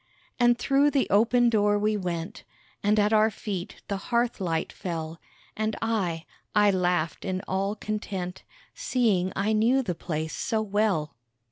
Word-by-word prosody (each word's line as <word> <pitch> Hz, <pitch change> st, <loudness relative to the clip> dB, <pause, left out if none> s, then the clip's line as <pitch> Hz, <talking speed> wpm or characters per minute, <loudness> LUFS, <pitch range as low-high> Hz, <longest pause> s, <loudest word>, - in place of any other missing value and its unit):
And 240 Hz, 0 st, +5 dB
through 275 Hz, +3 st, +3 dB
the 280 Hz, -2 st, +1 dB
open 240 Hz, +4 st, +4 dB
door 205 Hz, -1 st, +3 dB
we 210 Hz, +1 st, +1 dB
went, 180 Hz, +2 st, -4 dB, 0.4 s
And 210 Hz, +1 st, +3 dB
at 210 Hz, +1 st, +3 dB
our 215 Hz, 0 st, +5 dB
feet 195 Hz, -4 st, -6 dB
the 200 Hz, -, -2 dB
hearth 235 Hz, -2 st, +1 dB
light 165 Hz, -3 st, -1 dB
fell, 165 Hz, -3 st, -5 dB, 0.3 s
And 215 Hz, 0 st, -1 dB
I 185 Hz, -8 st, -1 dB, 0.3 s
I 210 Hz, -1 st, +5 dB
laughed 180 Hz, -3 st, 0 dB
in 185 Hz, 0 st, -3 dB
all 195 Hz, +2 st, -1 dB
content, 200 Hz, -4 st, -4 dB, 0.3 s
Seeing 225 Hz, -, +1 dB
I 205 Hz, +3 st, +1 dB
knew 240 Hz, +5 st, +3 dB
the 180 Hz, -, -2 dB
place 160 Hz, -2 st, -4 dB
so 220 Hz, -, -1 dB
well. 205 Hz, -7 st, 0 dB
205 Hz, 150 wpm, -27 LUFS, 180-220 Hz, 0.4 s, And